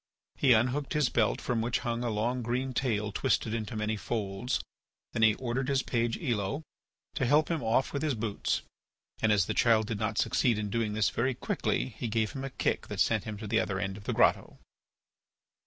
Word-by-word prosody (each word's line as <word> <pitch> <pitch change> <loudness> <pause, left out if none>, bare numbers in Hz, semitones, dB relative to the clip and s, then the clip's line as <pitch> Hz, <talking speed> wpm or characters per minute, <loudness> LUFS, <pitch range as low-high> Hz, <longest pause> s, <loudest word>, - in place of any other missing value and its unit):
He 130 -3 +5
unhooked 125 +5 +1
his 150 -5 +2
belt 115 -3 +1
from 120 -2 -1
which 120 +2 0
hung 120 0 -1
a 120 - 0
long 115 +4 -1
green 125 +3 -2
tail 105 -6 0
twisted 110 +2 0
into 110 -1 -3
many 110 0 -1
folds. 105 +2 -2 0.5
Then 115 - -1
he 110 -1 +6
ordered 130 +1 -2
his 135 -2 +1
page, 115 -1 0
Elo, 125 - -1 0.5
to 145 - -2
help 150 +5 +3
him 165 - 0
off 120 +4 +1
with 140 - -1
his 155 -4 0
boots 110 -2 -1 0.6
and, 110 - +3
as 100 -4 +4
the - - -2
child 110 -2 +4
did 110 -1 -3
not 110 0 -1
succeed 120 -4 +2
in 105 -1 -3
doing 110 -1 0
this 110 -1 +2
very 130 +2 0
quickly, 65 - -1
he 120 - -5
gave 110 -1 0
him 135 - -6
a 135 - -3
kick - - -1
that - - -6
sent 110 -3 +2
him 105 -2 -5
to 110 - -7
the 110 +2 +2
other 100 -3 -1
end 95 -1 -2
of 100 0 -11
the - - -1
grotto. - - +2
115 Hz, 210 wpm, -30 LUFS, 105-125 Hz, 0.6 s, he